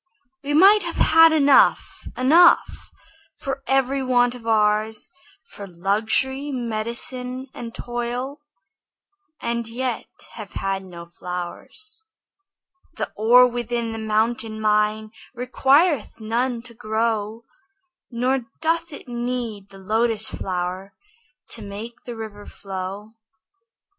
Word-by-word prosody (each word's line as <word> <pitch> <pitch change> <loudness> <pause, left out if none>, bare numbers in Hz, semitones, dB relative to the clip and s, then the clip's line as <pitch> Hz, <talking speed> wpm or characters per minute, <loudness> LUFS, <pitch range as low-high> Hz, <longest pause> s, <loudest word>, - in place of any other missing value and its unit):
We 290 +1 -1
might 400 +6 +7
have 340 -2 -4
had 325 0 +6
enough, 285 -3 +3
enough 320 +8 +4 0.5
For 275 0 -4
every 270 0 +2
want 245 -1 +2
of 240 -2 -11
ours, 215 +3 +1 0.4
For 200 - -8
luxury, 220 +10 0
medicine, 250 +2 -3
and 235 -1 -7
toil, 245 +4 -4 1.0
And 235 -1 -2
yet 245 +1 -3 0.2
have 215 -4 -10
had 195 0 -2
no 170 -2 -10
flowers. 180 - -7 0.9
The - - -4
ore 245 +4 +6
within 240 -1 -3
the 225 - -5
mountain 220 +1 -1
mine 215 0 +1 0.2
Requireth 265 - +2
none 235 +2 -1
to 245 -1 -12
grow; 220 0 -2 0.7
Nor 250 +1 0
doth 330 +1 0
it 285 - -10
need 240 -4 -4
the 195 - -13
lotus 220 +2 0
flower 185 +1 -4 0.5
To 230 - -4
make 210 +3 -8
the 240 - -5
river 215 -2 -8
flow. 195 +2 -7
235 Hz, 110 wpm, -23 LUFS, 215-260 Hz, 1.0 s, might